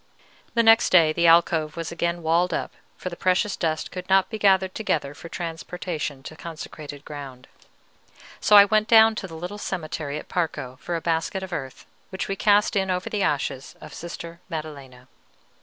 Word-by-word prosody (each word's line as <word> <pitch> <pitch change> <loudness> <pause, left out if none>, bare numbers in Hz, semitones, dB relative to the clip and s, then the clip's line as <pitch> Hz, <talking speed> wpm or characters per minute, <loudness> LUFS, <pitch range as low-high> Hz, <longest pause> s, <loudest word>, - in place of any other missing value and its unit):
The 230 - +4
next 225 0 +6
day 165 -4 +5
the 170 +1 +2
alcove 165 -1 +3
was 165 0 -4
again 170 0 -2
walled 170 +3 +2
up, - - -3 0.3
for 185 - -5
the 170 - -8
precious 185 +3 +1
dust 160 -1 -2
could 180 0 -7
not 190 +2 +3
be 220 - -4
gathered 190 -2 +3
together 150 -9 -2
for 145 +4 -11
transportation 165 -4 -5
to 155 - -9
consecrated 155 -3 -9
ground; 135 -4 -9 0.9
so 210 - +4
I 200 0 +10
went 215 +1 +2
down 225 -1 +7
to 195 - -5
the 165 - -10
little 180 +5 -6
cemetery 155 -6 -4
at - - -8
Parco 130 -7 -3
for 175 - -4
a 165 - -3
basket 165 +3 -1
of 190 -1 -7
earth, 135 -5 -6 0.2
which 190 - -4
we 195 - -2
cast 205 +1 +3
in 190 -1 +1
over 180 0 -2
the 210 - -1
ashes 140 -5 -2
of - - -11
Sister 170 0 -8
Maddelena. 140 -6 -8
170 Hz, 185 wpm, -24 LUFS, 155-190 Hz, 0.9 s, I